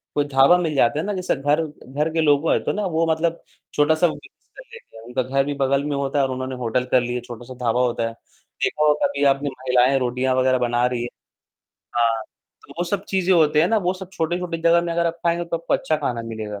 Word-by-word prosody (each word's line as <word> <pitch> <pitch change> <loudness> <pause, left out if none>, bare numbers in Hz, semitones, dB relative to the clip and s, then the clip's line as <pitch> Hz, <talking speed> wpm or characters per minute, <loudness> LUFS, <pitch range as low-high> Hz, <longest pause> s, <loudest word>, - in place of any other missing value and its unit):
कोई 145 - +1
ढाबा 135 +6 +6
मिल 165 -4 -2
जाता 120 +1 +2
है 160 - -2
ना, 205 - -2
जैसे 185 -1 -1
घर 145 +3 +1 0.3
घर 150 +4 -1
के 165 - +1
लोगो 150 +1 +3
है - - +3
तो - - 0
ना, 210 0 -2
वो 165 -2 0
मतलब 165 +1 -1 0.3
छोटा-सा 155 +3 +3
बिज़नेस 160 - -10
कर - - -10
लेते 465 - -14
हैं, 110 - -12
उनका 125 +2 -2
घर 135 +2 +1
भी 145 - -2
बगल 140 0 +1
में 145 -1 -2
होता 140 +1 -1
है 135 - +3
और 130 - -3
उन्होंने 130 0 -4
होटल 125 0 -1
कर 130 - +5
लिया, 120 0 -3
छोटा-सा 120 +1 -10
ढाबा 120 +2 +2
होता 120 -2 0
है। 115 - -6 0.5
देखा 150 - +1
हो 150 - +5
कभी 140 - 0
आपने 140 +1 -2
महिलाएँ 130 0 +2
रोटियाँ 125 +1 0
वगैरह 130 0 +3
बना 120 0 +1
रही 125 -1 -1
हैं 120 - -4 0.9
हाँ, 115 -1 +2 0.4
तो - - -14
वो 175 - 0
सब 195 +2 -3
चीजें 190 -1 +1
होती 155 -3 +4
हैं 160 - +5
ना, 225 - +2
वो 180 -2 0
सब 185 0 -10
छोटे-छोटे 170 +1 -2
जगह 170 +1 +4
में 170 -1 -2
अगर 170 0 +1
आप 165 - -1
खाएँगे 170 0 +1
तो 170 0 -2
आपको 165 - -1
अच्छा 155 - 0
खाना 125 -6 -3
मिलेगा। 110 -3 -6
140 Hz, 245 wpm, -22 LUFS, 125-165 Hz, 0.9 s, ढाबा